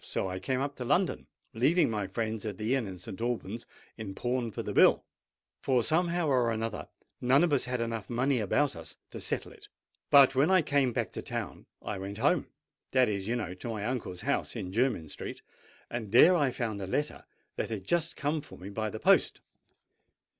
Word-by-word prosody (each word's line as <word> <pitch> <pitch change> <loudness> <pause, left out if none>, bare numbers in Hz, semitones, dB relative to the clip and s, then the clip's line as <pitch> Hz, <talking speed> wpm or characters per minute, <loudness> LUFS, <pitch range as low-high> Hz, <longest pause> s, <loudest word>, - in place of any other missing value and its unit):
So - - -2
I 95 0 -4
came 130 +7 -1
up 140 +1 -2
to 125 - -4
London, 170 +9 +1 0.3
leaving 145 +10 +3
my 105 -3 -2
friends 110 +1 -3
at 105 -4 -4
the 110 +5 0
inn 130 -6 0
at 95 -1 -7
St. 95 +4 -8
Alban's 120 -2 -3 0.3
in 105 -4 -6
pawn 120 0 -1
for 105 - -5
the - - -4
bill—for 125 -3 +1
somehow 170 +3 +1
or 125 -4 +3
another 115 0 -3 0.3
none 130 +5 +4
of 170 -4 +2
us 140 - +2
had 125 0 -2 0.3
money 130 +3 +1
enough 110 - 0
about 145 +8 +1
us 80 -1 -9
to - - -7
settle - - -3
it. - - -15 0.4
Well, 140 -1 +10
when 140 +5 +3
I 185 -3 +5
came 140 -4 +2
back - - -2
to - - -5
town, - - -5 0.2
I - - -4
went 100 +2 -6
home: 145 +7 +2 0.5
that 130 -2 +4
is, 100 -1 -3
you 120 - 0
know, 105 -7 -3
to 95 +6 -7
my 105 -2 -3
uncle's 115 -7 -3
house 140 +2 -1
in 95 -6 -4
Jermyn 115 -8 +1
Street; - - -8 0.4
and 115 -4 -5
there 160 +10 +8
I 145 -5 +3
found 110 -5 -3
a 95 - -4
letter 145 +10 -2 0.3
that - - -2
had 110 -4 -4
just 170 - 0
come 150 +1 -1
for - - -13
me 95 +2 -8
by 110 +1 -2
the 110 - -6
post. - - +3
120 Hz, 205 wpm, -30 LUFS, 105-140 Hz, 0.5 s, Well